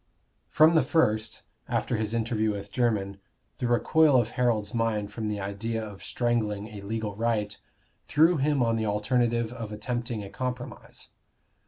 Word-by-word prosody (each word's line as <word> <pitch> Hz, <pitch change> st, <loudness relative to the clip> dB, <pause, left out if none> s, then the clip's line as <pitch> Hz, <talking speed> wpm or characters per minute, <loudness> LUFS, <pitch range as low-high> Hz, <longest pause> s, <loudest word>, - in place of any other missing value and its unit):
From 155 Hz, +2 st, +5 dB
the 160 Hz, -, +5 dB
first, 115 Hz, -6 st, +1 dB, 0.3 s
after -, -, 0 dB
his 110 Hz, 0 st, -1 dB
interview 110 Hz, -1 st, 0 dB
with 100 Hz, -1 st, -5 dB
Jermyn, 105 Hz, -5 st, 0 dB, 0.4 s
the 125 Hz, -, 0 dB
recoil 135 Hz, +4 st, +4 dB
of 115 Hz, -2 st, 0 dB
Harold's 120 Hz, -3 st, 0 dB
mind 110 Hz, -3 st, 0 dB
from 110 Hz, -2 st, -3 dB
the 105 Hz, -1 st, -2 dB
idea 110 Hz, +3 st, -3 dB
of 100 Hz, -2 st, -11 dB
strangling 110 Hz, -4 st, -1 dB
a 105 Hz, -2 st, -9 dB
legal 105 Hz, 0 st, -3 dB
right 110 Hz, -2 st, -1 dB, 0.5 s
threw 160 Hz, +3 st, +4 dB
him 140 Hz, -1 st, +2 dB
on 115 Hz, -1 st, +1 dB
the 110 Hz, -1 st, -1 dB
alternative 115 Hz, +2 st, +1 dB
of 115 Hz, -3 st, -6 dB
attempting 115 Hz, 0 st, -3 dB
a 100 Hz, -, -8 dB
compromise. 125 Hz, -1 st, -6 dB
115 Hz, 155 wpm, -27 LUFS, 105-120 Hz, 0.5 s, From